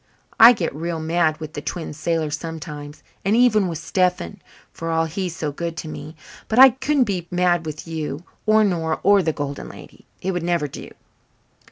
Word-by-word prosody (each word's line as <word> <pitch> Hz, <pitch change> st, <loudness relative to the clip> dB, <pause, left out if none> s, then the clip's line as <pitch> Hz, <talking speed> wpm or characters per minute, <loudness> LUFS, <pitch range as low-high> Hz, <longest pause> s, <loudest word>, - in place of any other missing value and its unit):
"I 230 Hz, +2 st, +10 dB
get 180 Hz, -, -3 dB
real 165 Hz, +2 st, -3 dB
mad 160 Hz, -1 st, +1 dB
with 155 Hz, 0 st, -7 dB
the -, -, -5 dB
Twin 165 Hz, -3 st, -5 dB
Sailors 155 Hz, 0 st, -1 dB
sometimes, 150 Hz, -2 st, -8 dB, 0.2 s
and 200 Hz, +3 st, +2 dB
even 220 Hz, -5 st, +4 dB
with 165 Hz, -2 st, -3 dB
Stephen, 180 Hz, -, -1 dB, 0.3 s
for 165 Hz, -, -5 dB
all 165 Hz, 0 st, +1 dB
he's 175 Hz, +1 st, -4 dB
so 150 Hz, -2 st, -3 dB
good 170 Hz, +3 st, -5 dB
to 160 Hz, -, -5 dB
me. 155 Hz, +1 st, -8 dB, 0.3 s
But 220 Hz, -, -2 dB
I 265 Hz, +1 st, +10 dB
couldn't 270 Hz, +2 st, +1 dB
be 185 Hz, -6 st, -3 dB
mad 175 Hz, -2 st, +1 dB
with 155 Hz, +2 st, -7 dB
you 160 Hz, -1 st, -4 dB, 0.2 s
or 215 Hz, 0 st, +5 dB
Nora 165 Hz, -5 st, 0 dB
or 200 Hz, 0 st, +5 dB
the 160 Hz, -3 st, 0 dB
Golden 145 Hz, -2 st, -5 dB
Lady. -, -, -14 dB
It 190 Hz, -, -2 dB
would 175 Hz, -1 st, -2 dB
never 170 Hz, -3 st, 0 dB
do." -, -, -9 dB
165 Hz, 190 wpm, -22 LUFS, 155-185 Hz, 0.3 s, I